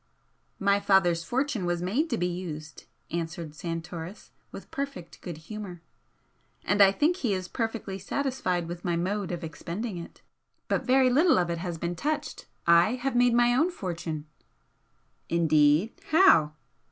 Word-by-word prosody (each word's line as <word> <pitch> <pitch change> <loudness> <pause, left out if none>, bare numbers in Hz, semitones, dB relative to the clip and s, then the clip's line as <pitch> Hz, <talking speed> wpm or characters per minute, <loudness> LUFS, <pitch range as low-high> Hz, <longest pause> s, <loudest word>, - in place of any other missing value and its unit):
"My 200 0 +2
father's 175 -4 +3
fortune 260 +1 -1
was 175 0 -1
made 255 - 0
to 235 - 0
be 175 - 0
used," 165 -4 -6 0.3
answered 165 -2 -4
Santoris, 165 +3 -6 0.2
with - - -10
perfect 275 -11 -6
good 170 -4 -6
humour 180 0 -8 0.8
"And 205 0 +3
I 195 -1 +8
think 310 - +1
he 235 - 0
is 185 -1 -4
perfectly 225 -3 -3
satisfied 195 -6 -1
with 175 0 -7
my 175 -2 0
mode 190 +3 -2
of 175 -1 -4
expending 175 +5 -5
it. 170 - -11 0.4
But - - 0
very 260 0 +5
little 315 +6 +4
of 175 -1 +1
it 170 - -3
has 175 -1 -4
been 170 +2 -3
touched. 295 - -3 0.2
I 170 +7 +5
have 255 +1 -2
made 245 -1 +4
my 240 0 +4
own 315 +8 +3
fortune." 170 - -5 1.0
"Indeed! 155 +3 +3 0.2
How?" 170 - +5
185 Hz, 155 wpm, -27 LUFS, 170-240 Hz, 1.0 s, I